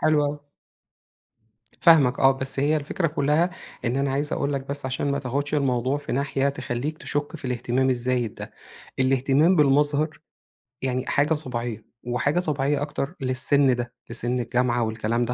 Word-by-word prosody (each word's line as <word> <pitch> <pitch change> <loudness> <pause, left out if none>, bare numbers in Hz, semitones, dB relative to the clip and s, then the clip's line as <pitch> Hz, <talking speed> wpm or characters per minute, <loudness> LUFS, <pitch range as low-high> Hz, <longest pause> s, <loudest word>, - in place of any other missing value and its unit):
حلو 155 -1 +3
اوي. 145 +1 -2 1.4
فاهمك، 145 -6 +5
آه، 135 0 +6
بس 135 0 -2
هي 150 +3 +2
الفكرة 155 +4 -1
كلّها 150 +3 +1 0.4
إن 120 +1 0
أنا 140 0 0
عايز 145 +3 -1
أقول 140 0 -1
لك 135 0 -4
بس 140 -1 -3
علشان 130 +2 -1
ما 140 - -1
تاخدش 140 +3 -3
الموضوع 130 -1 +1
في 145 - -7
ناحية 140 +1 0
تخليك 140 +2 -4
تشك 145 +2 -3
في 145 - -8
الاهتمام 125 +1 0
الزايد 125 -2 0
ده، - - -8 0.5
الاهتمام 135 +6 +3
بالمظهر 150 +1 +2 0.6
يعني 130 0 -1
حاجة 145 +3 +2
طبيعيّة 120 -7 -5
وحاجة 125 +7 0
طبيعيّة 145 -4 0
أكتر 145 +2 -3
للسن 130 +1 +3
ده، 120 0 -5 0.2
لسن 120 +1 -1
الجامعة 120 0 +1
والكلام 115 +2 -1
ده، 120 - -2
135 Hz, 155 wpm, -24 LUFS, 125-145 Hz, 1.4 s, آه